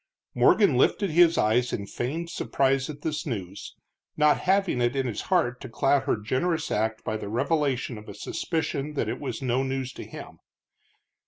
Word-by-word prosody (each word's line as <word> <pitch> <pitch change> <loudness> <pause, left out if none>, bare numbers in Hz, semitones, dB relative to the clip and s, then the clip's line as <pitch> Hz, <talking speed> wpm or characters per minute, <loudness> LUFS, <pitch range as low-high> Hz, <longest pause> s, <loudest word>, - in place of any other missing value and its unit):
Morgan 200 - +4
lifted 195 +8 +2
his 170 +1 +5
eyes 120 +3 +2
in 100 - -3
feigned 160 - -4
surprise 135 -3 0
at 145 -1 -8
this 155 -1 -2
news, 100 - -6 0.4
not 150 -1 +4
having 190 -8 +1
it 120 +2 +1
in 135 -1 0
his 120 -4 -3
heart 140 -10 +1
to 130 - -7
cloud 135 +4 +2
her - - +1
generous 145 +10 -1
act 110 +1 -1
by 110 - -2
the 100 - -6
revelation 130 -1 0
of 105 - -13
a 100 - -8
suspicion 150 - -3
that 115 - -1
it 120 +3 -3
was 140 -1 -5
no 125 0 +1
news 135 -1 -3
to - - -8
him. - - -10
135 Hz, 180 wpm, -26 LUFS, 120-155 Hz, 0.4 s, his